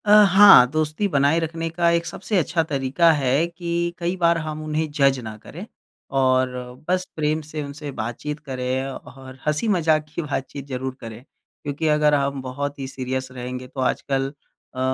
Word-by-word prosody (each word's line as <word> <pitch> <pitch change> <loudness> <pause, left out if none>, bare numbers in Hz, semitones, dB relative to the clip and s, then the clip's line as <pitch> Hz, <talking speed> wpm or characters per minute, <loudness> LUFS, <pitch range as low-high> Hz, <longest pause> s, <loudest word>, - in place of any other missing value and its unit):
अ, 205 - +2 0.2
हाँ। 195 -9 +8
दोस्ती 155 +6 0
बनाए 145 -1 +2
रखने 165 0 -3
का 170 +1 +1
एक 170 0 -1
सबसे 190 +4 -3
अच्छा 170 -1 +1
तरीक़ा 140 +4 +3
है 140 +1 +2
कि 170 0 -3
कई 175 +1 -2
बार 170 -1 +3
हम 155 -1 -5
उन्हें 155 0 -2
जज़ 140 -2 +2
ना 110 -2 -7
करें, 170 - -10 0.4
और 130 -1 +2 0.4
बस 185 +1 +1
प्रेम 155 0 0
से 155 0 -6
उनसे 145 +1 -7
बातचीत 120 +7 -4
करें 130 0 -2
और 130 0 -11
हँसी-मज़ाक 155 -1 +1
की - - -1
बातचीत 140 -2 -5
ज़रूर 130 -1 -4
करें। 115 +1 -9 0.4
क्योंकि 145 +2 -2
अगर 150 -1 +3
हम 140 -1 -1
बहुत 140 +2 -5
ही 135 - -4
सीरियस 130 0 -4
रहेंगे 125 0 -6
तो 135 - -10
आजकल 135 +1 0 0.5
अ, - - -5
145 Hz, 170 wpm, -22 LUFS, 130-165 Hz, 0.5 s, हाँ